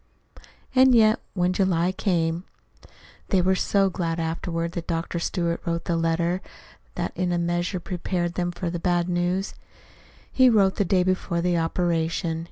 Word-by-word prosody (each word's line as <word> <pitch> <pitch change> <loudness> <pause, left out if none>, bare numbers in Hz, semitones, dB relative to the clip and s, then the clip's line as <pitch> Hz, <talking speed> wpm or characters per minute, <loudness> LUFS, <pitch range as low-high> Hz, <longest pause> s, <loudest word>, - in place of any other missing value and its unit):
And 260 -1 +6
yet, 220 -1 +5 0.2
when 180 -1 +1
July 180 -2 +1
came 170 -3 -1 0.9
They 190 - +3
were 185 +1 +3
so 195 +1 +2
glad, 165 -1 -2
afterward, 165 +1 -2
that 170 -1 -6
Dr. 170 0 -2
Stewart 170 -1 -1
wrote 170 0 -2
the 170 - 0
letter 165 +2 0 0.5
that - - -2
in 180 -1 -1
a 175 - +1
measure 175 +2 -1
prepared 175 -1 -3
them 175 0 -1
for 175 0 -4
the 175 - -3
bad 175 0 +1
news. 180 +2 -1 0.8
He 260 -1 +5
wrote 200 -4 +3
the 205 - +2
day 185 0 +2
before 185 -2 -1
the 175 0 +1
operation. 165 0 -1
175 Hz, 160 wpm, -24 LUFS, 170-185 Hz, 0.9 s, And